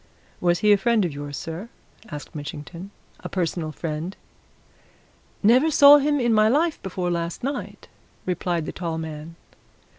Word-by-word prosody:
"Was 175 0 +1
he 210 - +5
a 205 - +7
friend 225 -1 +2
of 165 - -3
yours, 145 0 -6
sir?" 170 +8 -6 0.4
asked 150 0 -8
Mitchington. 150 +5 -7 0.3
"A - - -7
personal 170 -3 -2
friend?" 160 +3 -5 1.3
"Never 250 +9 +5
saw 290 -1 +8
him 290 0 +1
in 240 -2 +2
my 215 0 +5
life 310 +6 +1
before 180 -1 -3
last 170 +2 -3
night!" 280 +2 -5 0.4
replied 175 -2 -1
the - - -4
tall 165 -2 -4
man. 160 0 -7
180 Hz, 150 wpm, -24 LUFS, 160-230 Hz, 1.3 s, saw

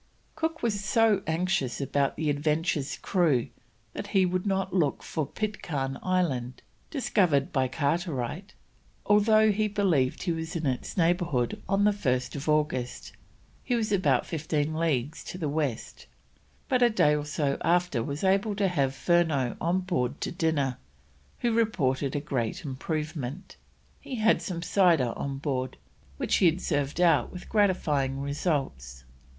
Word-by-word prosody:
Cook 320 0 -3
was 205 -4 0
so 215 0 +3
anxious 165 -5 0
about 140 0 0
the 155 -1 0
Adventure's 150 0 -1
crew 150 -9 +1 0.4
that - - -5
he 190 - +5
would 185 +2 -1
not 190 -1 -1
look 165 -7 +1
for 155 -4 -3
Pitcairn 150 -10 -3
Island, 140 -10 -1 0.3
discovered 180 - +1
by 130 -2 +2
Carteret, 155 - -2 0.5
although 215 +1 +5
he 215 +1 +1
believed 185 -11 +1
he 175 - 0
was 160 +1 -4
in 165 -2 -2
its 130 +5 -2
neighbourhood 170 -8 +1
on 195 +1 +2
1st 140 -9 0
August 150 -8 -1 0.5
(he 250 - 0
was 220 -3 -1
about 150 -11 +2
fifteen 155 -1 -1
leagues 155 -3 -1
to - - -6
the 165 -4 -2
west), 145 -5 -3 0.6
but 255 -3 +1
a 240 - +6
day 150 -9 +3
or 150 - -2
so 145 -1 -1
after 175 -7 +2
was 140 +7 -4
able 195 +2 +2
to 195 -1 +1
have 140 -6 0
Furneaux 160 -8 +1
on 175 +3 +1
board 145 -8 -2
to - - -2
dinner, 160 -6 0 0.6
who 235 -1 +1
reported 145 - +1
a - - +1
great 135 -1 -3
improvement. 150 +2 -4 0.4
He 265 - -6
had 225 -1 +3
some 170 -4 -4
cider 170 - +3
on 140 -1 -4
board, 130 -3 -3 0.4
which - - +1
he 185 - +5
had 165 +2 +2
served 145 -2 -1
out 175 -2 +3
with 180 - -9
gratifying 150 -10 +1
results. 135 - -3
160 Hz, 145 wpm, -28 LUFS, 140-190 Hz, 0.6 s, a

